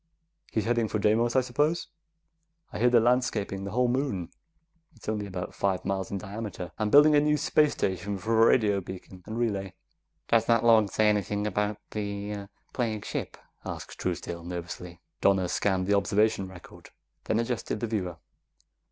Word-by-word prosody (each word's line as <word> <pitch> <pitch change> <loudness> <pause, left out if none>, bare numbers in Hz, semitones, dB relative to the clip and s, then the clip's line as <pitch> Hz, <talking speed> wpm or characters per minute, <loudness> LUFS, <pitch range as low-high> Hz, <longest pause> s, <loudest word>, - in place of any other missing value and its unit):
"He's 110 - 0
heading 120 -1 +1
for 110 - -1
Deimos, 110 +4 +2
I 130 - +6
suppose. 145 +7 0 0.9
I - - -4
hear 125 +2 +5
they're 120 -1 +6
landscaping 115 -5 +1
the - - -4
whole 125 +4 +2
moon 125 - -1 0.7
it's 115 - -16
only 105 -1 -2
about 90 -2 -5
five 95 -2 -1
miles 95 -1 -2
in 100 - -3
diameter 100 -3 -6
and 105 -1 0
building 150 +2 +8
a - - +7
new 150 +1 +2
space 150 0 +3
station 95 +2 -2
for 110 +3 +1
a 115 - +7
radio 105 -5 +3
beacon 95 0 -10
and 110 - -5
relay." 100 -5 -1 0.5
"Does 115 -1 +3
that 115 -1 +4
log 110 -3 +5
say 110 - +3
anything 105 0 +1
about 105 0 -1
the 100 -1 -4 0.2
plague 110 -4 -2
ship?" - - -4 0.3
asked - - -7
Truesdale 85 -1 -3
nervously. 85 0 -7 0.2
Donna 95 -2 +3
scanned 95 0 0
the 100 - +2
observation 100 0 +2
record, 95 -2 -13 0.4
then 110 - +1
adjusted 115 -2 -2
the 115 - -1
viewer. 95 -7 -3
105 Hz, 170 wpm, -28 LUFS, 95-115 Hz, 0.9 s, building